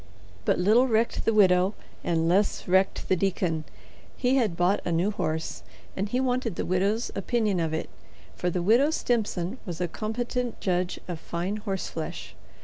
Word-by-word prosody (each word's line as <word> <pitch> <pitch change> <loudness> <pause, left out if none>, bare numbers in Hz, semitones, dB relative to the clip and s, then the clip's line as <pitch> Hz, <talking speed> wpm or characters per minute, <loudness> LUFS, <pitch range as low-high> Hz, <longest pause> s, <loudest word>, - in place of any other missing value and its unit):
But - - +3
little 220 +8 +4
recked 230 -1 +1
the - - +4
widow 190 -1 +4 0.3
and 165 -1 +1
less 195 +4 +1
recked 190 +1 +2
the 185 - +3
deacon. 175 -4 0 0.5
He 255 +1 +2
had 215 -10 +1
bought 180 +3 +3
a 175 - -2
new 175 +5 +2
horse 160 -5 -3 0.3
and 200 +2 -2
he 250 - 0
wanted 250 -5 0
the - - -2
widow's 200 +6 0
opinion 215 -6 0
of 165 -2 0
it, 160 - -2 0.5
for 180 - -1
the 175 0 -1
Widow 235 - +5
Stimson 225 - -1
was 175 -5 -6
a 180 - 0
competent 240 +5 -3
judge 180 -1 -1
of 175 -3 -4
fine 175 +6 -3
horseflesh. 190 -6 -4
195 Hz, 165 wpm, -27 LUFS, 175-225 Hz, 0.5 s, Widow